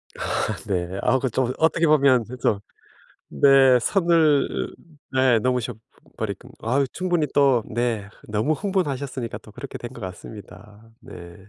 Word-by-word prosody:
아 - - -2
네. 90 -1 -2
아 130 +1 +3
그 130 - -1
좀 125 +1 0
어떻게 165 +1 +2
보면 140 -5 +4 0.2
좀 100 - +1 0.7
네 135 -2 +5
선을 165 - +2 0.4
네. 130 -3 +3
넘으셔 125 0 -1 0.4
버릴 - - -3 0.3
아 135 +5 +1
충분히 175 -5 0
또 135 -4 +4
네 115 -3 -1 0.2
너무 110 +9 +1
흥분하셨으니까 140 - -3
또 105 - -16
그렇게 - - -8
된 120 +1 -8
것 120 - -11
같습니다. 105 +3 -11
네. 85 0 -11
125 Hz, 240 characters per minute, -23 LUFS, 110-145 Hz, 0.7 s, 네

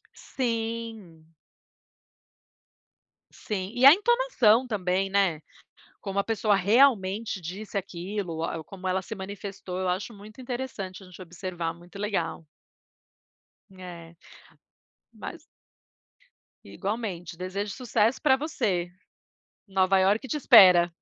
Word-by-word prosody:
Sim. 225 -8 -4 2.1
Sim. 195 -1 -5
E 250 +2 +3
a 280 - +12
entonação 405 - +3
também, 195 -2 -1
né? 190 -6 +1 0.6
Como 195 -1 -4
a 200 - +2
pessoa 220 -2 +1
realmente 205 -1 +3
disse 195 +5 -7
aquilo, 190 -1 -4
o 165 - -2
a 160 - -4
como 190 +1 -9
ela 185 0 0
se 220 - -7
manifestou, 195 -2 -7
eu 185 - -1
acho 190 +6 -2
muito 210 +4 -13
interessante 240 -7 -5
a - - -13
gente 180 +1 -14
observar, 175 -1 -5
muito 175 +3 -14
legal. 170 -6 -2 1.3
É. 170 -3 -11 1.0
Mas - - -9 1.2
Igualmente, 195 -5 -5
desejo 195 +3 -4
sucesso 235 -2 +1
pra 265 -3 +5
você. 225 - -2 0.8
Nova 190 0 +3
York 210 +7 +2
te 300 - -2
espera. 180 -10 +7
195 Hz, 110 wpm, -27 LUFS, 180-225 Hz, 2.1 s, a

